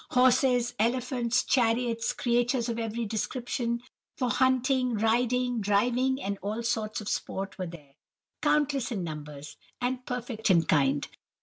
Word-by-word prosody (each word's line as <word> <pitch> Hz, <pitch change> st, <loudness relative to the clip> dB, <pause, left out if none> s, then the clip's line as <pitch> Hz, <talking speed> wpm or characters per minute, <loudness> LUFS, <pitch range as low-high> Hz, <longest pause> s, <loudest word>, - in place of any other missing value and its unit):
Horses, 250 Hz, -1 st, +3 dB
elephants, 245 Hz, +1 st, +1 dB
chariots, 235 Hz, -2 st, +1 dB
creatures 240 Hz, 0 st, +1 dB
of 230 Hz, 0 st, -2 dB
every 230 Hz, +1 st, -2 dB
description, 235 Hz, +2 st, -2 dB, 0.3 s
for 250 Hz, -2 st, 0 dB
hunting, 255 Hz, -1 st, +2 dB
riding, 240 Hz, +2 st, +1 dB
driving, 245 Hz, +6 st, +2 dB
and 200 Hz, -5 st, -3 dB
all 215 Hz, +4 st, -3 dB
sorts 220 Hz, -2 st, -1 dB
of 210 Hz, -, -8 dB
sport 195 Hz, -1 st, -3 dB
were 185 Hz, -, -2 dB
there, 150 Hz, -5 st, -12 dB, 0.5 s
countless 280 Hz, -4 st, +1 dB
in 200 Hz, -6 st, -2 dB
numbers, 150 Hz, -2 st, -7 dB, 0.2 s
and 250 Hz, +1 st, -2 dB
perfect 245 Hz, -3 st, -3 dB
in 170 Hz, -3 st, +5 dB
kind. 140 Hz, -2 st, +2 dB
235 Hz, 130 wpm, -28 LUFS, 205-250 Hz, 0.5 s, in